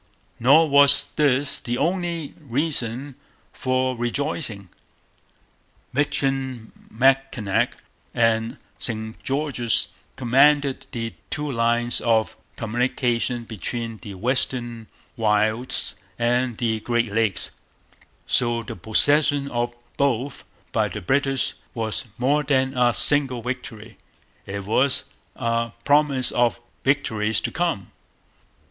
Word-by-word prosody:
Nor 145 +7 +6
was 140 -1 +6
this 145 -2 +2
the 120 -1 -3
only 170 -2 -1
reason 140 -2 -1 0.4
for 130 0 0
rejoicing. 120 - -2 1.2
Michilimackinac 130 -4 0 0.4
and 115 -1 +1 0.2
St 110 -1 -4
Joseph's 135 -4 +1 0.3
commanded 140 +2 +3
the 115 -1 -4 0.2
two 150 -1 -3
lines 120 0 +1
of 110 -5 +1 0.2
communication 120 +1 -1
between 115 +1 -5
the 100 -2 -9
western 120 0 -2 0.3
wilds 110 +2 0 0.2
and 120 0 +1
the 115 -3 0
Great 120 -1 -1
Lakes; 110 -5 0 0.7
so 120 -1 +1
the - - -7
possession 140 - +4
of 120 0 -2 0.2
both 140 -1 -1 0.3
by 110 -1 +1
the 105 +1 -6
British 135 +6 +1 0.2
was 110 -6 -2
more 140 +4 +2
than 135 -2 +1
a 125 -2 +3
single 135 -5 +3
victory, 115 -4 -6 0.5
it 100 0 -4
was 125 +6 +2 0.3
a 115 0 -1
promise 145 -3 +3
of 120 -1 +1 0.2
victories 110 -7 +1
to - - -3
come. 165 - -2
120 Hz, 100 wpm, -23 LUFS, 115-140 Hz, 1.2 s, Nor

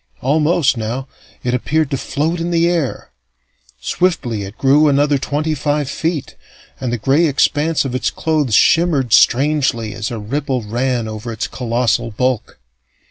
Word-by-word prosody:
Almost, 150 0 +2
now, 120 +5 -4 0.4
it 125 - -1
appeared 150 +4 0
to - - +1
float 160 +6 -2
in 170 +1 -2
the 170 0 +2
air. 170 -6 -2 0.7
Swiftly 125 - -1
it 100 +2 -8
grew 145 +3 +4
another 145 0 +2
twenty 150 +4 -1
five 145 0 -1
feet, 160 +1 -3 0.4
and 125 -3 -3
the 120 - -1
gray 140 +8 +2
expanse 145 +2 +1
of 130 - -3
its 130 - 0
clothes 150 -8 0
shimmered 160 -8 +3
strangely 130 -5 +3
as 110 0 -4
a 120 - -5
ripple 130 +3 -2
ran 120 +2 -1
over 110 +2 -6
its 110 - -3
colossal 120 -1 -1
bulk. 125 +1 -2
135 Hz, 150 wpm, -17 LUFS, 120-155 Hz, 0.7 s, grew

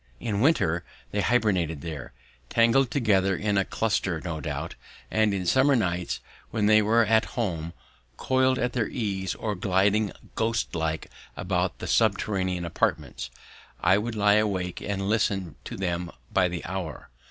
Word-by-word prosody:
In 105 -3 -1
winter 85 - +2 0.3
they 105 - 0
hibernated 95 -11 +1
there, 80 -6 -6 0.4
tangled 120 +3 +4
together 100 -8 +2
in 105 +1 0
a 95 - +3
cluster 95 -5 -1
no 80 -1 -4
doubt; - - -4 0.4
and 110 -1 +3
in 95 -2 -2
summer 130 +8 +4
nights 90 -6 -1 0.3
when 105 - 0
they 110 +1 +6
were 110 +2 +4
at 110 +1 +3
home, 85 -8 -2 0.4
coiled 130 0 +2
at 125 0 -1
their 120 -4 0
ease 95 -5 -2
or 105 - -2
gliding 100 +2 +2 0.2
ghost 115 +1 -1
like 80 -1 -2 0.3
about 90 -1 -1
their - - -6
subterranean 95 -4 +1
apartments, 85 - -1 0.5
I 95 +3 +4
would 115 +2 -3
lie 105 0 +4
awake 95 -4 -2
and 95 -1 -2
listen 100 -5 0
to - - -6
them 90 -2 -2 0.2
by 95 -2 +4
the 85 -1 -5
hour. 90 -8 -5
100 Hz, 155 wpm, -26 LUFS, 90-110 Hz, 0.5 s, they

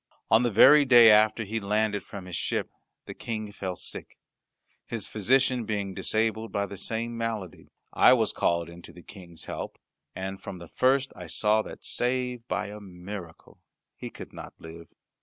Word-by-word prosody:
On 110 +2 +6
the 120 - +2
very 135 +8 +7
day 120 -4 +8
after 110 +1 +4
he 110 +2 -3
landed 105 0 0
from 100 -1 -9
his 90 -2 -6
ship - - -2 0.3
the - - -7
King 110 -2 -5
fell 95 -3 -5
sick. - - -6 0.7
His 115 -4 -3
physician 125 +3 +2
being 100 -3 -3
disabled 110 +3 -1
by 100 0 0
the 100 - -8
same 115 +4 -3
malady, 115 -6 -4 0.3
I - - +7
was - - +1
called 85 -1 0
in 85 +1 -12
to 85 - -13
the 90 +1 -14
King's 90 -4 -11
help; - - -6 0.4
and 95 +1 -5
from 95 - -7
the 85 -1 -10
first 135 +1 +2
I 90 - -9
saw 105 +6 +2
that, - - -10
save 125 -1 -2
by 100 +2 -2
a 105 +1 -8
miracle, 90 -3 -10 0.4
he - - -7
could - - -11
not - - -9
live. 80 0 -11
105 Hz, 175 wpm, -27 LUFS, 95-115 Hz, 0.7 s, day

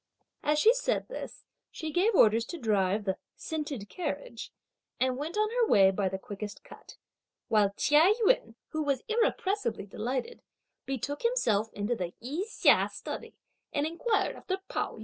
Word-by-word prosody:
As 300 0 +2
she 440 +10 +6
said - - -1
this, - - -7 0.2
she 315 -1 -5
gave 380 +7 +2
orders 225 -3 +5
to 345 - -6
drive 205 - +1
the 190 -1 0 0.2
"scented" 300 -9 -4
carriage, 370 - -5 0.5
and 255 0 +2
went 310 +8 -4
on 430 0 +3
her 475 -1 +2
way 195 - +6
by 195 0 0
the 190 - -3
quickest 205 +2 -7
cut; - - -14 0.5
while 210 -3 +4
Chia 305 +6 +5
Yün, 230 - +2
who 315 - -2
was 280 -4 0
irrepressibly 410 - 0
delighted, 255 - -4 0.5
betook 270 +2 -3
himself 225 - +1
into 205 +4 -1
the 185 - -2
I 295 - -3
Hsia - - +4
study, - - -7 0.4
and 290 0 0
inquired 410 +8 0
after 375 -1 -3
Pao - - -2
yü. - - -12
285 Hz, 160 wpm, -29 LUFS, -, 0.5 s, she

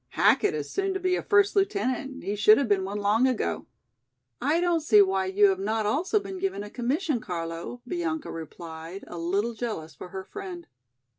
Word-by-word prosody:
Hackett 415 +1 +4
is 450 - -4
soon 390 -1 -1
to - - -1
be 365 0 +1
a - - -2
first 405 0 +3
lieutenant, 275 -9 -1
he 200 - -2
should 215 +1 +6
have 280 - +1
been 200 -3 +2
one 200 +2 -4
long 210 +5 +3
ago." 205 - -1 0.7
"I 305 +4 +2
don't 350 -1 +2
see 220 -9 +5
why 190 -1 +3
you 200 +2 +5
have 190 -1 0
not 215 +2 -1
also 345 - +1
been 385 -2 -7
given 380 - -2
a 205 - -9
commission, 270 +4 -1
Carlo," 170 +5 -5
Bianca 335 -2 -3
replied, 165 +2 -8
a 175 - -8
little 200 +7 0
jealous 210 -9 -5
for 180 - -10
her 190 +1 -6
friend. 365 - -8
225 Hz, 195 wpm, -27 LUFS, -, 0.7 s, should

